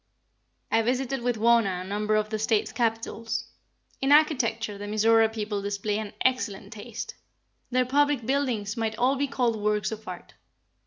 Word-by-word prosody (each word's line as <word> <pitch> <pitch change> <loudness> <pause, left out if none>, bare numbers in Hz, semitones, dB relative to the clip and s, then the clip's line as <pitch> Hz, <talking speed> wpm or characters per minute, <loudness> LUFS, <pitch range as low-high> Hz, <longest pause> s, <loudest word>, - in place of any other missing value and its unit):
I 225 - +4
visited 255 +2 -1
with 245 0 0
Wauna 220 -5 +3
a 185 - -7
number 210 +2 0
of 215 0 0
the 215 - -1
States' 220 0 +1
Capitals. 230 0 -2 0.6
In 270 +1 +2
architecture 240 -8 +3
the 205 - -6
Mizora 220 +1 +4
people 210 -2 -3
display 205 +1 -2
an 215 -2 -6
excellent 215 -5 0
taste. 235 - -7 0.6
Their 255 0 +2
public 285 -1 +2
buildings 245 -6 0
might 225 -1 -2
all 255 +3 +3
be 280 +1 0
called 245 -4 0
works 210 -1 0
of 220 0 -7
art. - - -8
225 Hz, 160 wpm, -27 LUFS, 210-250 Hz, 0.6 s, I